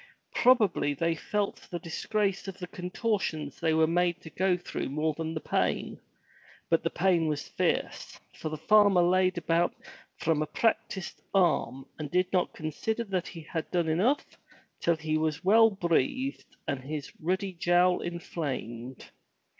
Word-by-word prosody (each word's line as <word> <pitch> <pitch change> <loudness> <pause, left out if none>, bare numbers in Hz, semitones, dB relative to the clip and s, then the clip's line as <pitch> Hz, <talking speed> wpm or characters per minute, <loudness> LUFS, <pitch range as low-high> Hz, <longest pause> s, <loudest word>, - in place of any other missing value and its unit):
Probably 210 - +3
they 165 +3 +1
felt 205 +5 -3
the 175 - -3
disgrace 195 +3 -2
of 195 -1 -6
the 180 - -5
contortions 180 - -2
they 160 - +1
were 160 0 +5
made 175 +1 +1
to 160 - -11
go 185 +1 +2
through 175 - -4
more 155 +3 0
than 160 +1 -4
the - - -1
pain, - - -1 0.7
but 165 - +4
the 165 - 0
pain 175 -3 +2
was 150 -1 -2
fierce, - - -2
for 155 - -5
the 155 - -4
farmer 200 +1 +5
laid 185 +1 +3
about 170 +1 +1 0.4
from 160 -2 +1
a 155 - -1
practiced 220 -3 -1
arm 160 -7 +2
and 150 -2 -4
did 180 +3 +1
not 180 -1 +2
con 155 0 -5
sider 220 +9 -2
that 190 -5 -2
he 170 - -8
had 160 +1 -5
done 175 -2 0
enough 205 - +2 0.5
till 170 - +2
he 155 -1 -1
was 155 +1 -1
well 225 +3 +7
breathed 200 - -1
and 140 - -1
his 145 0 -5
ruddy 190 +4 -1
jowl 175 +1 +3
inflamed. 130 -8 -5
175 Hz, 160 wpm, -29 LUFS, 155-190 Hz, 0.7 s, well